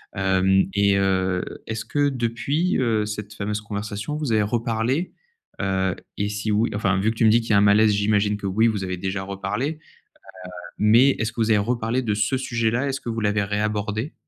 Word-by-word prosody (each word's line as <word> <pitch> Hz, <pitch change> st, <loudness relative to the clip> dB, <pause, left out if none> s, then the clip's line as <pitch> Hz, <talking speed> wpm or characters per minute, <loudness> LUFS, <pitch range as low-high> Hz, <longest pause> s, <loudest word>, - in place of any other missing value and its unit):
Hem 95 Hz, -1 st, +2 dB
et 100 Hz, 0 st, +3 dB
heu, 95 Hz, -2 st, +1 dB, 0.2 s
est-ce 110 Hz, 0 st, -4 dB
que 145 Hz, -1 st, +1 dB
depuis, 135 Hz, +7 st, -1 dB
heu, 115 Hz, -4 st, +1 dB
cette 105 Hz, 0 st, -6 dB
fameuse 105 Hz, 0 st, -3 dB
conversation 105 Hz, +5 st, -5 dB
vous 150 Hz, -6 st, -2 dB
avez 110 Hz, -, +3 dB
reparlé? 115 Hz, -, -1 dB, 0.5 s
Heu, 95 Hz, -1 st, 0 dB, 0.2 s
et 100 Hz, 0 st, -1 dB
si 105 Hz, +1 st, -3 dB
oui 110 Hz, +3 st, +2 dB
enfin, 95 Hz, -3 st, +1 dB
vu 105 Hz, +3 st, +1 dB
que -, -, -7 dB
tu 115 Hz, -, +2 dB
me -, -, +6 dB
dis 115 Hz, +2 st, +4 dB
qu'il 115 Hz, -, -9 dB
y -, -, +4 dB
a -, -, +6 dB
un -, -, +5 dB
malaise, 105 Hz, +1 st, +5 dB
j'imagine 105 Hz, 0 st, +1 dB
que 100 Hz, -, -5 dB
oui 110 Hz, +4 st, +2 dB
vous 105 Hz, -4 st, -1 dB
avez 90 Hz, 0 st, -3 dB
déjà 95 Hz, +2 st, -3 dB
reparlé, 100 Hz, +7 st, -3 dB, 0.9 s
heu, -, -, -12 dB, 0.2 s
mais 115 Hz, +6 st, +5 dB
est-ce 110 Hz, 0 st, -1 dB
que 115 Hz, -, -4 dB
vous 110 Hz, 0 st, +2 dB
avez 105 Hz, -, +5 dB
reparlé 115 Hz, +3 st, -1 dB
de 110 Hz, -4 st, -1 dB
ce 105 Hz, +5 st, 0 dB
sujet-là? 120 Hz, +1 st, -1 dB
Est-ce 135 Hz, 0 st, -3 dB
que -, -, -6 dB
vous 115 Hz, 0 st, -2 dB
l'avez 105 Hz, -1 st, +1 dB
réabordé? 105 Hz, +5 st, -2 dB
105 Hz, 210 wpm, -23 LUFS, 100-115 Hz, 0.9 s, me